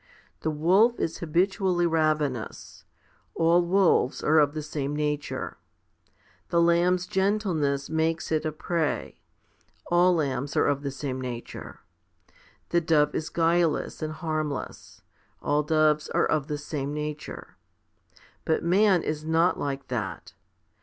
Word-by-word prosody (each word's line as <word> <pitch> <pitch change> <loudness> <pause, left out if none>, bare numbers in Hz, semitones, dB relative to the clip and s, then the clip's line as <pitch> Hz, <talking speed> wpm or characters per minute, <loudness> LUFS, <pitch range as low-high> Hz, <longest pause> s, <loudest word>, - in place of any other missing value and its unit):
The 160 - -2
wolf 185 +10 +3
is 165 - -2
habitually 175 +2 +1
ravenous; 155 -7 -1 0.5
all 170 +1 +4
wolves 175 -7 +2
are 155 +1 +4
of 145 0 +2
the 155 - -3
same 145 -1 -3
nature. 150 -1 -3 0.9
The 170 - +2
lamb's 175 +2 +3
gentleness 180 -9 0
makes 160 +1 -1
it 155 -1 +1
a 155 - -1
prey; 155 0 -2 0.7
all 175 +1 +5
lambs 140 -3 -2
are - - +4
of 140 -1 +1
the 140 - -3
same 135 -1 -4
nature. 120 -2 -7 0.9
The 170 - +2
dove 155 -3 +2
is 155 - -3
guileless 165 -1 +1
and 155 0 -3
harm 155 -1 -2
less; 140 - -8 0.4
all 145 +1 +1
doves 155 0 +2
are - - +2
of 150 -2 0
the 150 - -3
same 145 -1 -4
nature. 150 0 -6 0.9
But 160 - 0
man 185 +1 +3
is 155 0 -3
not 165 +3 +2
like 140 -1 -4
that. 110 -6 -4
155 Hz, 135 wpm, -26 LUFS, 145-170 Hz, 0.9 s, all